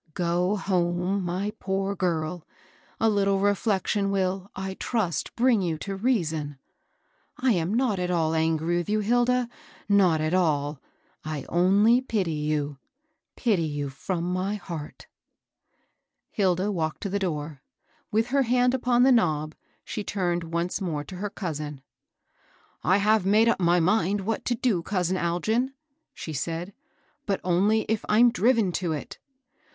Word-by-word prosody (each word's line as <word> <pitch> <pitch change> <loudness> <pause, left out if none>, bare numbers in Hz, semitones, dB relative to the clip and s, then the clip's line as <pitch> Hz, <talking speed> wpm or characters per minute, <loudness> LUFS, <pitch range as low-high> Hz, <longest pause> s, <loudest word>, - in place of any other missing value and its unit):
Go 180 +3 +1
liome, 180 +1 0
my 185 +4 -2
poor 195 +1 -1
girl 170 -2 -2 0.6
I - - +1
A - - +6
little 200 -2 +2
ii^fletttion 200 0 +1
will, 190 0 -1
I 190 0 -4
trast, 190 - -2
brkig 235 -4 +3
you 165 -3 -1
to 195 +5 -5
reaison. 165 - -1 0.8
I 260 -1 +2
am 180 +1 0
not 240 -6 +1
at 180 0 -1
all 165 -3 +1
angry 160 +1 +1
with 175 +3 -3
you, 215 0 +1
Hilda, 245 +3 +2 0.4
ttot 190 -6 +4
at 155 +2 -1
aH'; 150 -5 +1 0.4
I 155 -2 -4
only 200 +7 +4
Jaty 205 -10 -1
you, 145 -2 -2 0.6
—pity 215 -8 +1
you 145 -3 -2
fiwai 170 +6 -4
my 185 +3 -1
heart*" 170 -7 -8 1.3
HSda 190 0 +1
walked 160 +2 -3
«o - - -1
the 200 +1 -1
itoot. 155 -6 -3 0.5
With 225 +2 +1
h^ 275 0 +2
hand 250 +1 +3
iqpon 245 -1 +3
ibe 265 - +6
knob, 155 -8 +1 0.3
ahe 210 - -4
turned 175 -4 -1
once 170 +4 -2
mem 155 -6 -3
to 190 - -9
h^ 205 +2 -5
cousin. 150 -6 -5 0.5
*' - - -35
I - - +5
have 215 0 +3
made 210 +4 +4
up 235 - +2
my 175 0 +3
mind 190 +2 +2
what 215 +3 -3
to 245 - +1
do, 225 -7 +1
cous 180 -1 -1
in 185 - +1
Algin," 220 +10 0 0.4
she 160 - -6
said, 165 +6 -4 0.5
but 195 -2 0
only 195 +5 +3
if 220 0 -2
I'm 235 +3 +6
driven 230 -5 +2
to 175 -2 -1
it. 150 - -7
185 Hz, 155 wpm, -26 LUFS, 170-210 Hz, 1.3 s, A